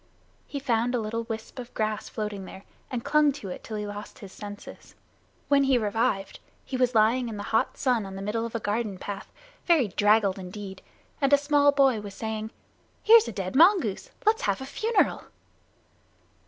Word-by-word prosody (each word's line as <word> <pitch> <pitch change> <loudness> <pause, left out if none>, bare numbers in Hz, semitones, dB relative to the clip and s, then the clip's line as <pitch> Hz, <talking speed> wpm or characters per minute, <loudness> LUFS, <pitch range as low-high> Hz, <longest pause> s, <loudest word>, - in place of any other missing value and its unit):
He 285 - -5
found 245 -2 0
a - - +1
little 230 +1 -3
wisp 225 +3 -7
of 245 -1 -8
grass 215 -1 -2
floating 210 -3 -4
there, 190 - -11 0.3
and 245 -2 -4
clung 300 -1 +4
to 215 -9 -8
it 180 - -7
till 220 - -5
he 210 - -3
lost 205 0 -8
his 195 -3 -11
senses. 205 -1 -10 0.5
When 280 -1 +4
he 270 -2 +4
revived, 205 -3 -1 0.3
he 265 - -5
was 250 -1 +1
lying 230 +3 +3
in 215 - -6
the 205 - -5
hot 225 - +1
sun 250 -5 +1
on 190 - -8
the 195 - -6
middle 220 +3 -1
of 230 0 -5
a - - 0
garden 210 -1 -2
path, 195 +1 -7 0.4
very 310 - +4
draggled 205 0 +3
indeed, 190 +1 -8 0.4
and 275 0 +2
a - - +9
small 285 0 +4
boy 270 -6 +3
was 200 -1 -9
saying, 220 0 -4 0.5
"Here's 455 0 +7
a - - -3
dead 190 +1 -4
mongoose. 330 - +4 0.2
Let's 440 +1 +3
have 200 -1 0
a 265 - -6
funeral." 435 - 0
225 Hz, 190 wpm, -27 LUFS, 205-265 Hz, 0.5 s, a